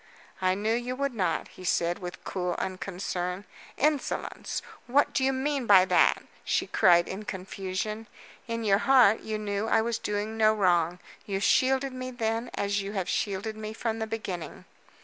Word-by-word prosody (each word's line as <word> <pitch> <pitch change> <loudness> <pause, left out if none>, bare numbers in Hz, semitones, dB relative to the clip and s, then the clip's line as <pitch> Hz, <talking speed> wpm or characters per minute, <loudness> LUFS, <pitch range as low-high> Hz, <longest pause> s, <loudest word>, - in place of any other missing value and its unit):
"I 185 0 +2
knew 215 +3 0
you 245 +2 -2
would 280 0 -1
not," 180 -7 -1
he 185 - -13
said, 175 -1 +1
with 180 -2 -7
cool 180 -2 -2
unconcern. 185 0 -3 0.3
"Insolence! 295 -1 -1 0.2
What 275 +4 +3
do 265 - +1
you 265 - +3
mean 270 -1 -1
by 190 -2 +8
that?" - - +3 0.2
she - - 0
cried 175 -1 +4
in 195 +3 -5
confusion. 195 +3 -4 0.4
"In 230 0 -3
your 200 -2 +3
heart 245 -5 +5
you 220 -1 -4
knew 205 0 -2
I 225 0 +3
was 235 0 -1
doing 210 +2 -3
no 215 0 +4
wrong. 175 -4 +2 0.3
You 195 -1 -1
shielded 265 +5 +2
me 255 0 -5
then 230 -1 -2
as 200 0 0
you 200 +1 -5
have 190 -4 -2
shielded 205 +2 -2
me 215 0 -6
from 225 0 -2
the 220 - -2
beginning." 195 -6 -5
210 Hz, 170 wpm, -28 LUFS, 190-230 Hz, 0.4 s, by